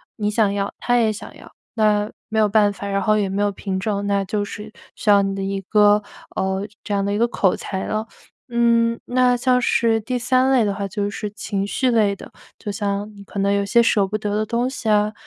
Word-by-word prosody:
你 210 -1 -1
想 210 -2 +2
要， 200 0 -2
他 245 - +1
也 225 -2 +3
想 210 - -10
要， - - -14 0.2
那 210 -1 +2 0.2
没 220 -1 0
有 215 - +4
办 205 -1 +4
法， 200 0 -7
然 195 0 0
后 215 +2 +2
也 205 -2 +1
没 195 +2 -1
有 205 0 +2
凭 195 -1 -4
证， 200 0 -2
那 200 -1 +1
就 205 +1 -2
是 210 +1 -8 0.2
需 215 - -2
要 200 -1 +7
你 195 0 -1
的 195 - -3
一 195 0 -2
个 210 +1 +4 0.3
呃， 190 +1 -1 0.2
这 205 - -3
样 200 0 0
的 200 - -1
一 - - 0
个 235 +2 +3
口 195 -5 +1
才 190 -1 -4
了。 215 +1 -2 0.4
嗯， 235 0 +2
那 250 0 +3
像 250 0 +2
是 230 -2 +2
第 250 +4 -2
3 255 +2 +2
类 255 -3 +4
的 200 - 0
话 200 0 -4
就 200 +1 -2
是 210 +1 -5
情 200 -2 -3
绪 255 +4 0
类 210 -4 +2
的， - - -12 0.3
就 205 - -5
像 205 0 -3
你 200 - -12
可 200 - -10
能 200 0 +2
有 200 0 +1
些 235 +4 +4
舍 205 -3 +2
不 210 +2 -2
得 205 -1 -3
的 215 - +1
东 235 +3 0
西 250 -4 -4
啊， 210 0 +2
210 Hz, 255 characters per minute, -21 LUFS, 200-225 Hz, 0.4 s, 要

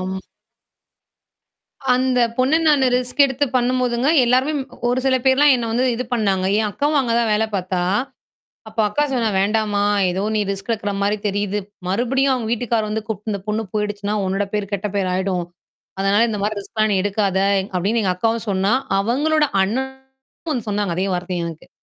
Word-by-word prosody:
ஆம். 190 +1 -4 1.7
அந்தப் 250 -2 +1
பொண்ணு 260 +5 +3
நானு 285 -3 +4
ரிஸ்க் 250 +3 +2
எடுத்துப் 265 0 -2
பண்ணும்போதுங்க, 250 +1 +1 0.2
எல்லாருமே 255 +5 +2
ம் 265 - -5 0.2
ஒரு 245 - +1
சில 265 -1 +3
பேர்லாம் 270 +2 +5
என்ன 235 -2 -2
வந்து 240 +3 +1
இது 250 - -3
பண்ணாங்க. 195 -5 +1
என் 215 - +1
அக்காவும் 290 +6 0
அங்க 240 -3 -1
தான் 230 -2 +1
வேலை 220 +1 +2
பாத்தா. 185 -1 -1 0.9
அப்ப 220 - -21
அக்கா 295 +8 +1
சொன்னா, 230 -3 +1
"வேண்டாம்மா, 205 0 +1 0.3
எதோ 185 +2 -2
நீ 210 - +2
ரிஸ்க் 195 +3 -5
எடுக்கிற 205 -2 -2
மாரி 205 +1 +1
தெரியுது. 205 0 -1 0.3
மறுபடியும் 260 +7 +1
அவங்க 235 -4 -2
வீட்டுக்கார் 230 -2 0
வந்து 220 0 -2
கூப்ட்டு 215 0 -4
இந்தப் 200 -2 -5
பொண்ணு 215 +1 -1
போயிடுச்சுன்னா, 205 -1 -2
உன்னோட 195 +2 0
பேரு 210 -1 -1
கெட்ட 200 +1 -1
பேரு 190 -2 0
ஆயிடும். 185 -2 -1 0.5
அதனால 195 +2 +3
இந்த 210 -2 -3
மாதிரி 210 0 -1
ரிஸ்க்லாம் 215 +1 -1
நீ 195 - +2
எடுக்காத" 200 -1 0 0.4
அப்படீன்னு 200 +6 +1
எங்க 185 -2 +1
அக்காவும் 225 +3 -1
சொன்னா. 195 +3 +1 0.3
அவங்களோட 295 +9 +2 0.2
அண்ணனும் 265 - -6
வந்து 240 -5 -4
சொன்னாங்க, 205 -3 -1
அதே 190 - 0
வார்த்தைய 175 -1 -3
எனக்கு. 165 -1 -10
220 Hz, 170 wpm, -20 LUFS, 200-250 Hz, 1.7 s, பேர்லாம்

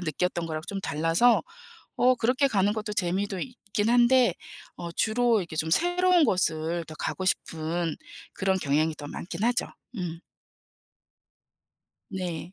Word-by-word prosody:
느꼈던 175 +1 -1
거랑 155 -1 -4
좀 195 -1 -4
달라서 165 +9 +3 0.5
어 255 +1 +4
그렇게 255 +4 +2
가는 205 -4 +2
것도 210 -1 -4
재미도 190 +1 -1
있긴 210 -2 -3
한데 245 +1 +4 0.4
어 170 -1 -6
주로 225 +5 +2
이렇게 170 -4 -6
좀 160 +1 -1
새로운 355 - +4
곳을 170 - 0
더 155 - -10
가고 185 - -3
싶은 165 -2 -1 0.4
그런 190 0 0
경향이 155 +2 +1
더 145 - -8
많긴 175 +5 -6
하죠. 240 +1 +2 0.3
음. 170 -2 -4 1.9
네. 180 -3 -5
190 Hz, 255 characters per minute, -27 LUFS, 165-235 Hz, 1.9 s, 어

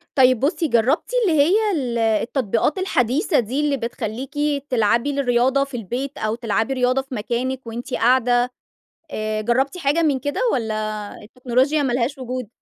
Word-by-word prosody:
طيب 255 -3 +5
بصي، 315 - 0
جربتِ 265 - +1
اللي 330 -8 +2
هي 320 +6 +3 0.2
ال 250 -6 -2
التطبيقات 230 - 0
الحديثة 300 - +1
دي 245 +4 -2
اللي 295 -2 +1
بتخليكِ 235 +1 -5 0.4
تلعبي 235 +2 +2
الرياضة 260 +1 +2
في 275 -2 -6
البيت، 245 +6 -4
أو 215 +1 -1
تلعبي 230 +2 -1
رياضة 255 +1 +1
في 265 -1 -8
مكانِك 245 +4 -3
وأنتِ 240 +3 -6
قاعدة، 245 0 +3 0.6
آآ، 215 0 -2
جربتِ 265 - 0
حاجة 310 +2 +1
من 285 -4 +2
كده 285 +3 -3
والَّا 215 -2 -3
التكنولوجيا 255 +6 0
ما 265 -3 0
لهاش 255 +3 -1
وجود؟ 255 -2 -5
250 Hz, 150 wpm, -21 LUFS, 230-275 Hz, 0.6 s, طيب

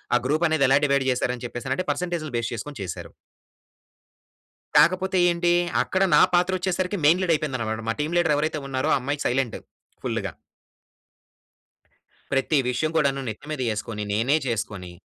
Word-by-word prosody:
ఆ - - +6
గ్రూప్ 155 +5 +1
అనేది 155 -3 +3
ఎలా 135 - +6
డివైడ్ 140 -1 +2
చేసారు 125 0 0
అని 125 - -8
చెప్పేసి 120 +2 -7
అని 130 - +1
అంటే 185 - -2
పర్సెంటేజ్‌లు 160 -1 -3
బేస్ 115 - -2
చేసుకొని 145 +6 -7
చేసారు. - - -7 1.6
కాకపోతే 185 +1 +4
ఏంటి 175 0 +1 0.3
అక్కడ 190 0 0
నా - - +7
పాత్ర 180 +1 +3
వచ్చేసరికి 185 +2 -1
మెయిన్ 170 +5 +5
లీడ్ 175 -2 +2
అయిపోయింది 150 -4 -2
అన్నమాట. 110 -1 -2
మా - - +2
టీమ్ 155 +4 -2
లీడర్ 160 -4 +3
ఎవరైతే 155 0 -1
ఉన్నారో 130 +3 -1
ఆ - - +2
అమ్మాయి 140 +3 -3
సైలెంట్ 125 -2 -1 0.5
ఫుల్‌గా... - - -3 2.0
ప్రతి 135 +3 +2
విషయం 125 +6 -1
కూడాను 135 -2 +1
నెత్తి 110 +7 -8
మీద 150 -4 -3
ఎసుకొని 105 0 -5
నేనే 125 +9 +2
చేసుకొని... 100 -6 -4
145 Hz, 165 wpm, -24 LUFS, 125-170 Hz, 2.0 s, నా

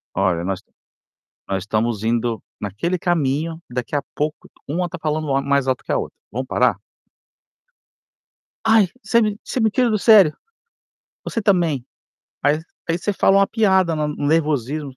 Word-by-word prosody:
Olha, 90 -3 +1
nós 95 0 -3 0.9
nós 95 -1 -2
estamos 110 0 -1
indo 115 0 0 0.2
naquele 105 - -2
caminho, 160 -1 0
daqui 125 +2 -4
a 145 - 0
pouco, 150 +1 -3 0.2
uma 175 +5 -1
tá 180 +1 -8
falando 155 0 -1
ma-mais 140 0 +1
alto 130 -1 0
que - - -5
a - - +2
outra. - - -5 0.2
Vamos 130 +4 -3
parar? - - +1 1.9
"Ai, 220 -3 +5 0.2
você 235 - +3
me 210 -1 -1
você - - -3
me 220 -2 +3
tira 250 +2 +2
do 215 - +2
sério". 200 -8 +6 0.9
"Você 230 - -3
também." 170 - +2 0.6
Aí 145 +2 +3 0.3
aí 165 +1 +1
você 205 +3 -1
fala 195 0 +3
uma 195 - +4
piada 190 -6 +2
na 150 -1 -1
no 145 -1 -3
nervosismos: 145 -3 0
150 Hz, 155 wpm, -21 LUFS, 125-185 Hz, 1.9 s, sério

